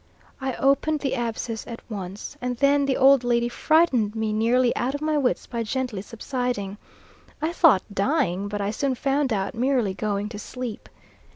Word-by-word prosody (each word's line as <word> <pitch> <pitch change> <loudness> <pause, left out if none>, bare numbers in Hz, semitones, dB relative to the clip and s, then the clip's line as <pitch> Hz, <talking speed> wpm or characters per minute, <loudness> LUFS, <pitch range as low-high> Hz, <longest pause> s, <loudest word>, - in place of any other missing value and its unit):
I 265 -1 -2
opened 280 +2 +2
the 275 - -1
abscess 230 -2 -3
at 230 -1 -7
once, 195 -2 -6
and 250 -1 -2
then 280 +1 +3
the 265 - +1
old 270 -1 +6
lady 240 -1 +2
frightened 250 -5 +2
me 220 -1 -1
nearly 240 +3 +2
out 260 +3 -1
of 285 - -5
my 310 0 +1
wits 275 -4 +1
by 235 -1 -4
gently 240 -3 -2
subsiding, 230 -3 -4 0.6
I 315 +3 -1
thought 305 - +5
dying, 200 - 0
but 205 0 -3
I 200 +1 -1
soon 265 +3 -1
found 275 +1 0
out 195 -2 -1
merely 245 -4 +1
going 205 0 -2
to 210 -2 -7
sleep. 245 0 -6
245 Hz, 175 wpm, -24 LUFS, 215-275 Hz, 0.6 s, old